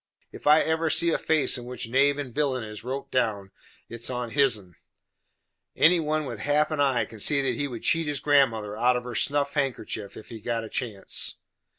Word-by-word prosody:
If - - -8
I 150 +1 +7
ever 160 0 0
see 170 +1 +3
a - - 0
face 155 -4 +2
in 120 - -9
which 125 -1 -6
knave 140 +4 +3
and 135 -5 -5
villain 135 -4 0
is 105 -1 -9
wrote 130 +3 -5
down, 105 -6 -1 0.4
it 115 - -8
is - - -1
on 125 -2 -4
hisen. 110 -10 +1 1.0
Any 170 +2 +5
one 155 -1 -1
with 120 -5 -6
half 150 +6 +1
an 155 - -2
eye 135 -4 +2
can 110 - -12
see 140 +7 +4
that 130 -2 +1
he 145 +4 -2
would 120 -4 -8
cheat 165 -1 +2
his 145 -2 -1
grandmother 115 -8 +2
out 125 +3 +2
of 120 - -5
her 125 0 -7
snuff 140 +4 0
handkerchief, 120 -7 -3
if - - -12
he 115 -2 -9
got 115 0 -2
a 110 - -8
chance." 110 -7 -2
130 Hz, 215 wpm, -26 LUFS, 115-145 Hz, 1.0 s, I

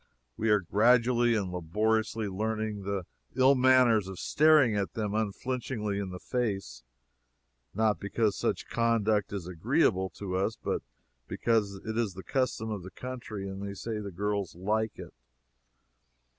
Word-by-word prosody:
We 110 - -1
are 105 -1 +4
gradually 120 +5 +3
and 100 -4 -1
laboriously 105 +5 0
learning 110 +1 -2
the 100 -2 -2 0.3
ill 130 +2 +6
manners 125 -5 +4
of 95 -1 -7
staring 150 - +4
them 105 +1 -2
unflinchingly 110 0 -2
in 100 -2 -3
the 90 - -6
face 100 - -3 0.9
not 110 -1 +2
because 105 +1 0
such - - -2
conduct 110 -3 +1
is 100 -4 -4
agreeable 95 - +1
to 95 -2 -3
us, 100 +4 0
but - - -2 0.5
because 110 -4 0
it 110 +1 -2
is 105 -6 -1
the 95 - -8
custom 125 -4 -1
of 105 -3 -3
the 90 - -9
country 115 -5 -6
and 95 0 -6
they 100 0 -5
say 110 +2 -4
the 100 -1 -5
girls 100 -1 -2
like 105 +4 -1
it. - - -9
105 Hz, 145 wpm, -29 LUFS, 100-115 Hz, 0.9 s, ill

